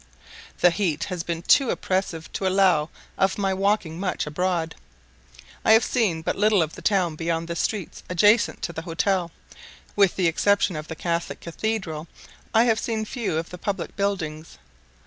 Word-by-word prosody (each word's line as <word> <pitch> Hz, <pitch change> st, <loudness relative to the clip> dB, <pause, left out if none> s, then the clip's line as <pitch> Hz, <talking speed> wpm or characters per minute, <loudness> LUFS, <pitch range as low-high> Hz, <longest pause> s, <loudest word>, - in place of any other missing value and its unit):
The 180 Hz, -, +6 dB
heat 170 Hz, -5 st, -1 dB
has 180 Hz, -3 st, -3 dB
been 170 Hz, 0 st, -4 dB
too 265 Hz, +6 st, +4 dB
oppressive 185 Hz, -4 st, -2 dB
to 190 Hz, -, -1 dB
allow 185 Hz, -5 st, +3 dB, 0.3 s
of 195 Hz, 0 st, +2 dB
my 195 Hz, -2 st, 0 dB
walking 190 Hz, -4 st, 0 dB
much 185 Hz, -1 st, -2 dB
abroad. 165 Hz, +1 st, -1 dB, 0.9 s
I 220 Hz, -, +6 dB
have 225 Hz, -, +6 dB
seen 190 Hz, -10 st, 0 dB
but -, -, -1 dB
little 210 Hz, -3 st, +3 dB
of 155 Hz, -, -5 dB
the -, -, -10 dB
town 185 Hz, -6 st, +1 dB
beyond 165 Hz, +1 st, -2 dB
the 170 Hz, -, -4 dB
streets 195 Hz, 0 st, -3 dB
adjacent 205 Hz, +5 st, +3 dB
to 170 Hz, -, -3 dB
the 160 Hz, -, -5 dB
hotel: 175 Hz, +1 st, 0 dB, 0.7 s
with 200 Hz, -2 st, +4 dB
the 185 Hz, -, +1 dB
exception 195 Hz, +2 st, +2 dB
of 155 Hz, 0 st, -6 dB
the 160 Hz, -, -6 dB
Catholic 170 Hz, +1 st, -2 dB
Cathedral, 170 Hz, -4 st, -3 dB, 0.4 s
I 225 Hz, 0 st, +5 dB
have 225 Hz, -2 st, +2 dB
seen 220 Hz, -2 st, -2 dB
few 215 Hz, -8 st, -2 dB
of 165 Hz, +1 st, -4 dB
the 180 Hz, -, -8 dB
public 195 Hz, -2 st, -3 dB
buildings. 165 Hz, -6 st, -3 dB
180 Hz, 170 wpm, -24 LUFS, 165-205 Hz, 0.9 s, The